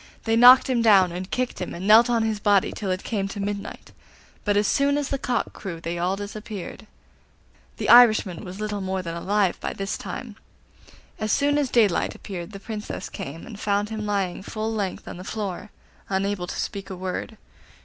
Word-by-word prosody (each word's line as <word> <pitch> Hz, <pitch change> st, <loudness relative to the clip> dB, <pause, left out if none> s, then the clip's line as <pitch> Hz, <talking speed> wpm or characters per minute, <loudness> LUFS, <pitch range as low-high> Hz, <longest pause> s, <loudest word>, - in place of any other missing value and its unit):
They 225 Hz, 0 st, +1 dB
knocked 250 Hz, +3 st, +8 dB
him 250 Hz, -3 st, +1 dB
down, 195 Hz, -5 st, +5 dB
and 180 Hz, +2 st, -6 dB
kicked 255 Hz, 0 st, -2 dB
him, -, -, -4 dB
and 175 Hz, +3 st, -6 dB
knelt 225 Hz, +3 st, +7 dB
on 235 Hz, -2 st, +2 dB
his 220 Hz, -2 st, -1 dB
body 205 Hz, -1 st, +3 dB
till 200 Hz, -, -5 dB
it 185 Hz, +1 st, -2 dB
came 200 Hz, -4 st, -2 dB
to 200 Hz, -, -7 dB
midnight; 200 Hz, 0 st, -5 dB, 0.5 s
but 205 Hz, -1 st, +1 dB
as 205 Hz, -, +3 dB
soon 280 Hz, +6 st, +2 dB
as 290 Hz, -1 st, -2 dB
the 275 Hz, -, -2 dB
cock 245 Hz, -2 st, -1 dB
crew 175 Hz, -5 st, -7 dB
they 170 Hz, +1 st, -4 dB
all 180 Hz, +2 st, 0 dB
disappeared. 205 Hz, 0 st, -7 dB, 0.9 s
The -, -, -3 dB
Irishman 215 Hz, -7 st, +6 dB
was 185 Hz, +2 st, -8 dB
little 210 Hz, -1 st, -3 dB
more 190 Hz, 0 st, -2 dB
than 165 Hz, -2 st, -5 dB
alive 195 Hz, +1 st, 0 dB
by -, -, -4 dB
this 195 Hz, +1 st, -4 dB
time. -, -, -7 dB, 0.8 s
As 215 Hz, -1 st, -1 dB
soon 285 Hz, +3 st, +2 dB
as 280 Hz, -3 st, 0 dB
daylight 215 Hz, -8 st, +2 dB
appeared 185 Hz, -2 st, -7 dB
the 195 Hz, -, -8 dB
Princess 215 Hz, 0 st, -6 dB
came, 150 Hz, +4 st, -7 dB
and 215 Hz, -3 st, -10 dB
found 205 Hz, 0 st, 0 dB
him 215 Hz, -1 st, -4 dB
lying 195 Hz, -4 st, -1 dB
full 220 Hz, +2 st, -4 dB
length 200 Hz, -4 st, -3 dB
on -, -, -7 dB
the 180 Hz, -, -8 dB
floor, 205 Hz, -1 st, -5 dB, 0.4 s
unable 195 Hz, -1 st, -1 dB
to -, -, -5 dB
speak 200 Hz, -1 st, -4 dB
a 190 Hz, -, -5 dB
word. 185 Hz, +4 st, -5 dB
205 Hz, 200 wpm, -24 LUFS, 190-220 Hz, 0.9 s, knocked